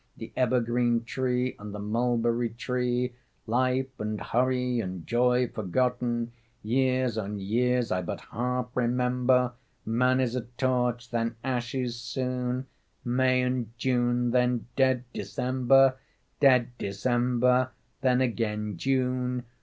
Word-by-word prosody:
The - - -9
evergreen 120 -1 +2
tree... 125 +1 -1
and 105 0 -7
the - - -5
mulberry 115 +2 0
tree... 125 +1 -1 0.3
Life 130 +2 0
and 105 0 -3
hurry 125 +1 0
and 95 -5 -4
joy 125 +1 +2
forgotten, 120 +3 -1 0.3
Years 130 0 +1
on 105 0 -4
years 120 +5 +1
I 90 - +1
but 85 - -4
half 125 +1 -1
remember... 125 0 +2 0.3
Man 125 +3 +2
is 125 -2 0
a 125 - 0 0.2
torch, 125 -2 0
then 115 0 -1
ashes 125 -1 -2
soon, 125 +1 -2 0.4
May 130 +1 +2
and 125 -2 -2
June, 120 0 +1
then 125 -1 +2
dead 130 -2 +3
December, 130 +1 +3 0.4
Dead 125 -4 +5
December, 125 +4 +1 0.3
then 130 -1 +3
again 105 -5 -1
June. 125 +1 0
125 Hz, 115 wpm, -28 LUFS, 120-125 Hz, 0.4 s, Dead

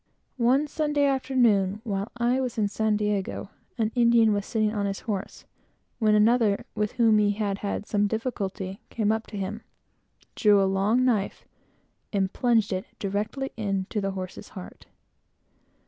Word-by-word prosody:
One 255 +5 +3
Sunday 295 -1 0
afternoon, 240 -8 +2
while 200 -2 -3
I 240 +2 +1
was 250 -3 -3
at 205 -2 +1
San 220 0 +1
Diego, 205 -1 -2 0.3
an 220 -2 0
Indian 235 -3 +4
was 205 0 -2
sitting 215 -2 0
on 205 -2 -1
his 195 0 -4
horse, 200 -4 -5 0.5
when 215 -2 +4
another, 215 -1 +3
with 210 -1 -1
whom 225 -4 +4
he 205 -1 +3
had 200 -1 -2
had 205 0 -3
some 205 -1 +1
difficulty, 200 -4 -4
came 215 -2 0
up 220 0 -2
to 210 - -7
him, 200 +3 -4 0.7
drew 210 -2 +5
a 195 - +3
long 200 +6 +2
knife, 215 -6 0 0.7
and 195 -2 0
plunged 225 -5 +2
it 185 0 -3
directly 210 +7 -3
into 200 -1 -2
the 195 0 -2
horse's 185 -1 -7
heart. 180 - -10
210 Hz, 155 wpm, -26 LUFS, 200-235 Hz, 0.7 s, drew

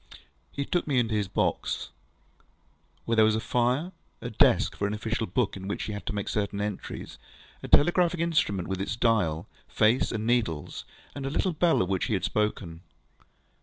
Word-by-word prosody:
He 140 - -3
took 175 +2 -1
me 140 -3 +1
into 115 -2 +1
his 105 -2 0
box, - - -1 1.1
where 115 - +1
there 110 - +6
was 110 0 +4
a - - 0
fire, 125 +9 0 0.3
a - - -6
desk - - +4
for 100 - -1
an 105 - -2
official 110 +1 -2
book 105 +4 0
in 95 0 -7
which 100 - -3
he 105 - -4
had 100 - -7
to - - -1
make 100 -1 -3
certain 100 -1 -1
entries, 105 -1 -5 0.4
a - - -7
telegraphic 175 +2 +4
instrument 160 - +1
with 95 0 -3
its 100 - -2
dial, 105 -9 +1 0.2
face, 110 +4 +2
and 110 -1 -3
needles, 110 -11 -1 0.3
and 140 - -6
the - - -1
little 180 +5 0
bell 165 - +3
of 90 - -4
which 95 -2 0
he 110 - 0
had 95 - -2
spoken. 95 -6 -2
110 Hz, 190 wpm, -27 LUFS, 100-130 Hz, 1.1 s, there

